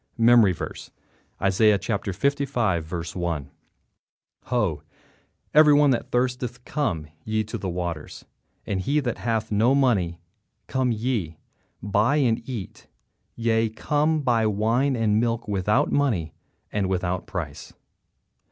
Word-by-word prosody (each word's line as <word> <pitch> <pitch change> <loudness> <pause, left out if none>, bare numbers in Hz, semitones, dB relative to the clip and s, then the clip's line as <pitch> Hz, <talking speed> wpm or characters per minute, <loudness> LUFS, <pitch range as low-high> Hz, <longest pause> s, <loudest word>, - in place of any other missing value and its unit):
MEMORY 115 -3 +6
VERSE, 85 - -6 0.5
Isaiah 100 +2 +4
55: 110 - -1 0.2
1 85 -6 -3 1.0
"Ho, 105 - 0 0.7
every 150 -1 +7
one 145 -1 +5
that 120 - -1
thirsteth, 125 0 -2
come 110 - -2 0.2
ye 110 0 -1
to 110 - -7
the 95 - -3
waters, 85 -3 -5 0.4
and 95 -2 -2
he 145 +9 +1
that 125 -5 -3
hath 110 -2 -1
no 115 +6 +3
money; 100 -11 +1 0.5
come 130 -2 0
ye, 110 -8 -2 0.5
buy, 105 +7 +2
and 125 -7 +2
eat; 115 -7 -7 0.5
yea, 115 -1 +1
come, 150 +7 0
buy 115 -4 +2
wine 115 +6 +1
and 110 -2 +2
milk 115 0 -1
without 105 +7 +1
money 110 - 0 0.4
and 100 -3 -1
without 90 -1 -2
price." 80 -7 -6
110 Hz, 120 wpm, -24 LUFS, 95-125 Hz, 1.0 s, every